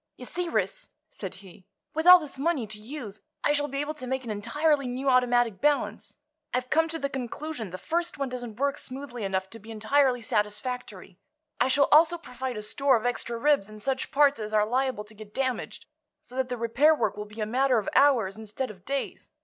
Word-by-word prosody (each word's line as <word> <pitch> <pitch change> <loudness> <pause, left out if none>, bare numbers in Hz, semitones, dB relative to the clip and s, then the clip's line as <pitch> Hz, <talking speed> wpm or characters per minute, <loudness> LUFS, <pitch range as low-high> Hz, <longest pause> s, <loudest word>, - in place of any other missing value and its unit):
"You - - -8
see, 355 -1 -2
Ris," - - -1 0.2
said 190 -2 -7
he, 185 0 -16 0.3
"with 320 +2 -1
all 360 0 +12
this 300 -5 -8
money 290 -5 0
to 215 0 -6
use 215 -3 -8 0.2
I - - +3
shall 290 0 +1
be 275 -1 -5
able 295 +1 -3
to 255 -5 -8
make 265 +1 -2
an 230 - -5
entirely 275 +7 +1
new 255 +3 -3
automatic 245 -4 +3
balance. 295 0 0 0.4
I've 250 0 -2
come 325 +1 +4
to 325 - -3
the 280 - -1
conclusion 265 -2 -5
the 185 - -6
first 340 - -2
one 275 -1 -1
doesn't 245 -3 -7
work 280 +1 0
smoothly 255 -3 -5
enough 190 -1 -1
to 225 - -9
be 220 +2 -14
entirely 245 +4 +2
satisfactory. 210 -3 -3 0.4
I - - +4
shall 280 +2 +4
also 325 +3 +6
provide 255 -6 -5
a 210 - -5
store 275 +4 +2
of 220 - -6
extra 235 -1 -1
ribs 275 -5 +2
and 215 0 -11
such 265 +4 -1
parts 285 -2 +4
as 215 0 -5
are 210 0 +4
liable 255 -1 0
to 210 +1 -14
get 215 0 -13
damaged, 260 -2 -2 0.3
so - - -15
that 260 -1 -1
the 250 - -3
repair 245 +7 +4
work 235 - 0
will 210 0 -5
be 210 +2 -12
a 215 - 0
matter 255 +3 +2
of 210 - -1
hours 235 -9 +4
instead 220 +3 -4
of 185 -3 -16
days. 275 0 -4
250 Hz, 215 wpm, -27 LUFS, 215-280 Hz, 0.4 s, all